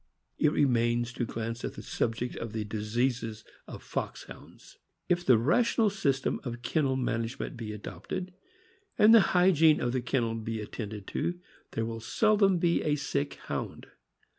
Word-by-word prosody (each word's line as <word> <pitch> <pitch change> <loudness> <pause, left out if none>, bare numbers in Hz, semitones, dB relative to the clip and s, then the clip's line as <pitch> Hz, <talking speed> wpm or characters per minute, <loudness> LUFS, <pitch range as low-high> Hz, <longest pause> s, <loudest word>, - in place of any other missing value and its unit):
It 150 - +4
remains 120 -4 +2
to 120 - -2
glance 115 +1 -4
at - - -4
the - - -8
subject 115 +2 -2
of 115 -1 -5
the 110 -1 -2
diseases 110 +1 -2 0.2
of - - -9
Foxhounds. - - -7 0.3
If 175 0 +1
the 125 -8 +6
rational 210 - +3
system 140 -9 0
of 120 -2 -6
kennel 135 +2 +1
management 120 +1 -2
be 115 -3 -6
adopted, 105 - -6 0.6
and 215 +2 +7
the 230 - +9 0.2
hygiene 165 -4 +5
of 120 - 0
the 130 0 -1
kennel 120 -2 0
be 115 0 -4
attended 105 -1 -6
to, 175 +1 -2 0.3
there 115 - -1
will 115 0 -4
seldom 200 - +3
be 170 0 +2
a 150 -1 +1
sick 140 0 -2
Hound. - - -5
125 Hz, 155 wpm, -29 LUFS, 115-160 Hz, 0.6 s, the